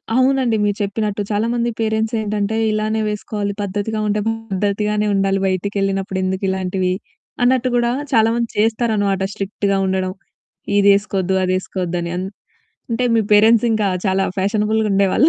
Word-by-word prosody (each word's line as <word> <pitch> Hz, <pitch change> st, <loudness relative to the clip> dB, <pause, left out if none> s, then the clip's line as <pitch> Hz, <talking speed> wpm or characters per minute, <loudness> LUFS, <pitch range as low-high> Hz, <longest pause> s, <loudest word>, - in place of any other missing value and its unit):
అవునండి. 260 Hz, -3 st, +3 dB
మీరు 205 Hz, 0 st, 0 dB
చెప్పినట్టు 205 Hz, 0 st, -2 dB
చాలా 210 Hz, +3 st, +1 dB
మంది 240 Hz, 0 st, 0 dB
పేరెంట్స్ 220 Hz, +1 st, 0 dB
ఏంటంటే, 210 Hz, 0 st, -1 dB, 0.2 s
ఇలానే 215 Hz, +1 st, 0 dB
వేసుకోవాలి 205 Hz, -1 st, -3 dB
పద్ధతిగా 205 Hz, +2 st, -2 dB
ఉంటే 210 Hz, +1 st, +1 dB
పద్ధతిగానే 210 Hz, -1 st, -1 dB
ఉండాలి 195 Hz, 0 st, +1 dB
బయటికెళ్ళినప్పుడు 195 Hz, 0 st, -1 dB
ఎందుకు 190 Hz, +1 st, -2 dB
ఇలాంటివి, 185 Hz, -1 st, -1 dB, 0.5 s
అన్నట్టు 255 Hz, 0 st, +3 dB
గూడా 240 Hz, 0 st, +2 dB, 0.2 s
చాలా 225 Hz, 0 st, +5 dB
మంది 235 Hz, -1 st, -1 dB
చేస్తారనమాట. 215 Hz, -3 st, +1 dB
స్ట్రిక్ట్‌గా 200 Hz, 0 st, -1 dB
ఉండడం. 185 Hz, 0 st, -1 dB, 0.7 s
ఇదేసుకోద్దు, 200 Hz, -2 st, +2 dB
అదేసుకోద్దు 185 Hz, -1 st, -2 dB
అని. 170 Hz, 0 st, -4 dB
అన్ 185 Hz, +1 st, -3 dB, 0.6 s
అంటే, 240 Hz, +2 st, 0 dB
మీ -, -, +4 dB
పేరెంట్స్ 225 Hz, +2 st, +5 dB
ఇంకా 215 Hz, -2 st, +1 dB, 0.2 s
చాలా 190 Hz, 0 st, +2 dB
ఫ్యాషనబుల్‌గుండేవాళ్ళు 210 Hz, +3 st, +2 dB
205 Hz, 130 wpm, -19 LUFS, 195-220 Hz, 0.7 s, చాలా